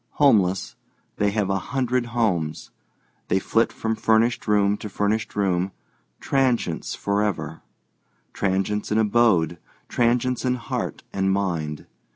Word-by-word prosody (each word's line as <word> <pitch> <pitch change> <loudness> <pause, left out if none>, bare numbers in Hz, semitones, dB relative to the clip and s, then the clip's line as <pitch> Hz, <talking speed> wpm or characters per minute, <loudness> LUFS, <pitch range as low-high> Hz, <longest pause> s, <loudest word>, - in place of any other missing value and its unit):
Homeless, 100 -10 +3 0.4
they 105 - +2
have 100 -1 0
a 95 - +1
hundred 125 +1 -1
homes. 95 -10 -1 0.6
They 95 - +2
flit 115 +4 +1
from 110 0 -2
furnished 115 +2 +2
room 105 -1 +3
to 105 - -7
furnished 105 +3 -1
room, 95 -2 0 0.5
transients 125 - 0
forever—transients 100 +1 -3
in 105 - +2
abode, 105 -7 +3 0.3
transients 125 +1 +1
in 125 -1 +1
heart 120 - -4
and 95 0 +1
mind. 85 -6 -2
105 Hz, 115 wpm, -24 LUFS, 95-115 Hz, 0.6 s, Homeless